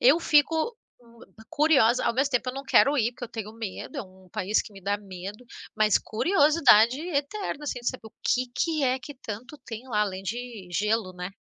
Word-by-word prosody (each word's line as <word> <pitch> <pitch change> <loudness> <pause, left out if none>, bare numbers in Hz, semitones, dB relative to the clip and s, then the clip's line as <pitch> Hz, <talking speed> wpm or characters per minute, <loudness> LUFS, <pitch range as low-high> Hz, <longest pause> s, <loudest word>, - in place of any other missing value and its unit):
Eu 290 +7 +6
fico, 320 - +2 0.2
hum, 235 -1 -20 0.3
curiosa 290 -7 +4
ao - - +1
mesmo 275 +3 +1
tempo 250 +1 +1
eu - - -12
não 275 +1 -6
quero 280 +2 +4
ir, 235 +1 +1
porque 245 - -7
eu - - -9
tenho 215 -2 -6
medo, 220 -4 -7
é - - -2
um 185 -1 -18
país 200 +3 0
que 210 - -13
me 195 - -12
dá 200 +1 0
medo. 200 +3 -9 0.3
Mas 215 -2 +4
curiosidade 285 - +4
eterna, 310 0 -3
assim, 255 -4 -3
de 240 - 0
saber 255 -4 -6
o - - -14
que 255 0 +1
que 315 -3 0
é 255 +1 +1
que 290 +3 -10
tanto 250 +3 -8
tem 230 +3 -8
lá, 210 -4 +1
além 190 -2 -3
de 230 -3 -6
gelo, 210 -1 0
né? 180 +1 -6
240 Hz, 210 wpm, -26 LUFS, 210-280 Hz, 0.3 s, Eu